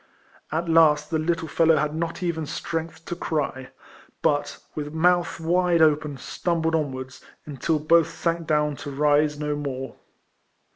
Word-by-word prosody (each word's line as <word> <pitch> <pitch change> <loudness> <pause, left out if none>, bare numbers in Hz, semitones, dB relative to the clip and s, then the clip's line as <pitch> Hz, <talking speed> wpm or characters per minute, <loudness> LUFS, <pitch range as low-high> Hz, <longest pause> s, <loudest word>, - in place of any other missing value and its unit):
At 165 +2 -1
last 155 -2 +4
the 160 - +1
little 165 0 -1
fellow 165 0 +3
had 150 +1 0
not 165 +3 -3
even 160 -3 -2
strength 165 +2 -5
to 175 - -4
cry, 145 -6 -3 0.5
but, - - +1 0.2
with 150 -1 -5
mouth 175 +1 +2
wide 170 0 +3
open, 150 -2 +2
stumbled 165 +5 -1
on 155 -4 0
wards, 130 0 -8 0.2
until 150 +2 -1
both 160 +1 +3
sank 170 -1 -2
down 150 -1 +1
to 145 - -7
rise 150 +1 +2
no 150 0 -2
more. 135 -2 -5
155 Hz, 150 wpm, -24 LUFS, 150-165 Hz, 0.5 s, last